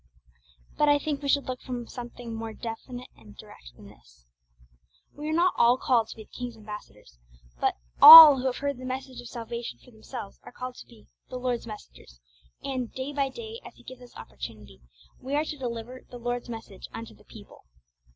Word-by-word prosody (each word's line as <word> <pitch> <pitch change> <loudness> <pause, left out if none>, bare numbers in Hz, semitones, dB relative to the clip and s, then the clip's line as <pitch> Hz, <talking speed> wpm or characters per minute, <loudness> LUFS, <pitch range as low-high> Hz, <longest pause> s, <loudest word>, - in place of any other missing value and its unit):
But 295 - +4
I 290 - +5
think 290 0 -4
we 280 - -4
should 285 0 +2
look 255 -1 -5
for 245 -2 -6
something 240 -1 -9
more 225 0 -6
direct 225 0 -7
and 250 -1 -8 0.3
definite - - -13 0.2
than - - -16
this. - - -21 0.9
We 300 +1 -6
are - - -1
not 345 +3 +2
all 240 +2 +4
called 235 -4 +1
to - - -10
be 220 - -11
the - - -28
King's 245 -2 -7
ambassadors, 210 - -12 0.4
but - - +1 0.3
all 310 -4 +13
who 260 - -1
have 255 - -2
heard 280 -2 -3
the - - -10
messages 260 0 -6
of 245 - -11
salvation 235 - -7
for 250 - -20
themselves 220 -1 -10
are - - -13
called 255 +1 -7
to - - -13
be 230 -3 -19 0.2
'the 255 - -6
Lord's 245 -2 -3
messengers,' 205 - -12 0.4
and 255 -4 -4
day 265 +2 -6
by 275 -1 0
day, 455 - -9
as - - -13
He - - -20
gives 255 -1 -12
us 245 - -16
opportunity, 105 - -10 0.4
we 270 +3 -4
are 300 +1 +1
to 305 - -5
deliver 245 -1 -6
'the 245 - -9
Lord's 245 0 -4
message 220 - -9
unto - - -9
the - - -21
people.' - - -15
245 Hz, 200 wpm, -26 LUFS, 225-270 Hz, 0.9 s, all